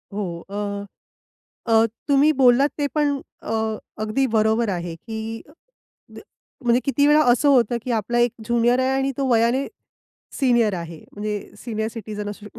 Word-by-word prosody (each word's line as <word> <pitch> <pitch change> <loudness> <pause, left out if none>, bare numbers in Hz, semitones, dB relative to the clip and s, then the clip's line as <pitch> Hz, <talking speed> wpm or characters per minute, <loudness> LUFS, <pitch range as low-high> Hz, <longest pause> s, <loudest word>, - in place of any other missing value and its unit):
हो, 185 -5 -4
अ, 200 0 -4 0.9
अ, 225 0 +6 0.2
तुम्ही 285 +2 +5
बोललात 255 +3 +5
ते 290 -1 0
पण 290 -2 +1 0.2
अ, - - -5 0.5
अगदी 215 +5 0
बरोबर 220 +1 +2
आहे, 175 -3 -3
की 225 +3 -6 0.7
द - - -10 0.5
म्हणजे 240 +1 +4
किती 280 +1 +2
वेळा 300 +1 +6
असं 270 +4 +3
होतं, 245 -3 +3
की 250 - -3
आपला 240 +3 -1
एक 240 - -5
ज्युनियर 240 +1 +2
आहे 260 0 +1
आणि 270 0 0
तो 275 - 0
वयाने 235 +4 +2 0.7
सीनियर 240 -6 +3
आहे 170 -2 -6
म्हणजे 210 +1 -3 0.2
सीनियर 220 -2 -3
सिटीझन 215 -2 -6
असू 205 0 -10
शकतो. 210 - -13
230 Hz, 155 wpm, -22 LUFS, 210-260 Hz, 0.9 s, अ